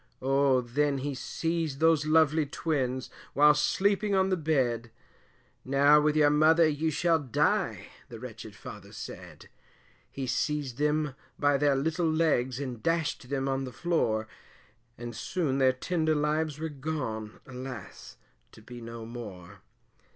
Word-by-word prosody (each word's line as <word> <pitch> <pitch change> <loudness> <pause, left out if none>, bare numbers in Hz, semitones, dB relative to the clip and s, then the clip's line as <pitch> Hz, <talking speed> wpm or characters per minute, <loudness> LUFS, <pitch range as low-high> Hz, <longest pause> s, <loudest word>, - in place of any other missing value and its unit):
Oh 135 0 +3
then 140 +4 0
he 140 +2 -3
seized 160 +1 -2
those 160 -2 +3
lovly 155 -1 +4
twins, 135 -4 -2 0.2
whilst 150 +1 +5
sleeping 200 +1 +1
on 190 0 +3
the 185 - +2
bed, 130 -8 0 0.7
Now 140 +3 +5
with 150 0 +2
your 150 -1 +5
mother 160 +2 +5
you 155 +1 0
shall 165 +2 +2
die, 145 - 0 0.2
the 115 - -9
wretched 110 -3 -9
father 105 0 -10
said - - -9 0.6
He 135 - -5
seized 140 -1 -2
them 150 -1 +1 0.2
by 145 -1 +3
their 145 0 +3
little 160 +4 0
legs, 140 -6 +1
and 125 -5 -5
dashed 165 -6 -1
them 135 -1 -1
on 135 0 -1
the 130 - -6
floor, 115 -7 0 0.7
And 120 -1 -7
soon 140 +2 -1
their 130 -1 +5
tender 155 +4 0
lives 150 0 0
were 160 +1 -3
gone, 130 -7 -4
alas! 125 -4 -9 0.4
to - - -14
be 120 +1 -10
no 115 0 -8
more. 105 -5 -9
145 Hz, 145 wpm, -29 LUFS, 125-155 Hz, 0.7 s, whilst